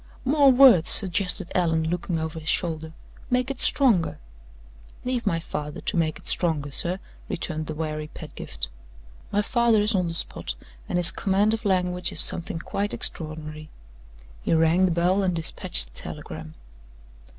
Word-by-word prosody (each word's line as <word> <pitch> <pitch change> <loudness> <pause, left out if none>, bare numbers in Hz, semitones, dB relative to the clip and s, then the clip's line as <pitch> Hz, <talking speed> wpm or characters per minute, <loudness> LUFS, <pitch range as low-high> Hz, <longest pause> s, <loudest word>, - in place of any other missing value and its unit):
"More 280 0 +5
words!" 245 -10 +6
suggested 190 -1 +2
Allan, 165 -3 +1
looking 175 0 -2
over 160 0 -4
his 155 -1 -5
shoulder. 160 -2 -2 0.4
"Make 250 +1 0
it 270 - -6
stronger." 230 - +2 0.9
"Leave 250 -3 -2
my 165 -4 +1
father 150 -2 -6
to - - -1
make 160 -2 0
it - - -18
stronger, 150 -5 +1
sir," 175 +6 +3 0.3
returned 155 -2 -4
the 155 - -5
wary 155 -1 -4
Pedgift. - - -8 0.6
"My 205 +1 +1
father 235 -1 +2
is 210 +2 +2
on 180 -3 0
the 165 - -2
spot, - - -2 0.3
and - - -1
his 175 -1 +8
command 200 +2 +1
of 225 0 -4
language 180 -2 0
is - - +1
something 170 -1 +4
quite 200 +5 -3
extraordinary." 155 -1 -1 0.7
He - - 0
rang 165 +3 +3
the 180 - +1
bell, 175 +4 +1
and 185 -2 0
dispatched 155 - -1
the - - -10
telegram. 80 - -9
175 Hz, 160 wpm, -24 LUFS, 160-200 Hz, 0.9 s, his